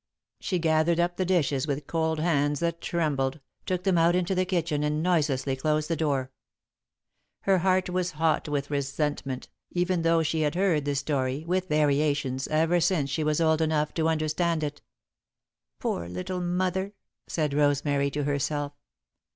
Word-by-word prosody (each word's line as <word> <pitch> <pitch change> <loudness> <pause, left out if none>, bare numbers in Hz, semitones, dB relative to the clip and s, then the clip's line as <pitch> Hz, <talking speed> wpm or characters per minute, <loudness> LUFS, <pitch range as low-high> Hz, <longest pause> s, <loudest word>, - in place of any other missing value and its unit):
She 185 - -1
gathered 160 0 +2
up 175 +1 +1
the 185 - 0
dishes 155 -6 +1
with 140 0 -2
cold 160 0 0
hands 145 -3 +1
that 170 0 -1
trembled, 150 -4 -1 0.3
took 180 -1 -1
them 185 -3 +3
out 170 +1 +4
into 180 +1 +1
the 185 0 +1
kitchen, 165 -5 0
and 150 +1 0
noiselessly 145 -6 +1
closed 155 +3 0
the - - +2
door. 140 -4 -1 1.1
Her 195 -1 +3
heart 185 +1 +2
was 180 -1 -1
hot 160 0 +1
with 145 0 -2
resentment, 140 -1 -2 0.2
even 180 0 0
though 165 0 +3
she 160 +1 0
had 150 +1 0
heard 175 -6 +2
the 145 0 0
story, 140 0 -1
with 185 +2 0
variations, 145 -3 +1
ever 160 +3 +2
since 160 -5 +1
she 155 - 0
was 150 0 +1
old 160 -1 +3
enough 155 -1 +1
to 160 -1 +1
understand 160 +1 0
it. 145 0 -4 1.0
"Poor 85 0 -3
little 180 - -4
mother," 185 +3 -1 0.3
said 150 -3 -1
Rosemary, 145 -1 +2
to 145 +1 -2
herself. 145 0 -1
155 Hz, 160 wpm, -27 LUFS, 145-175 Hz, 1.1 s, out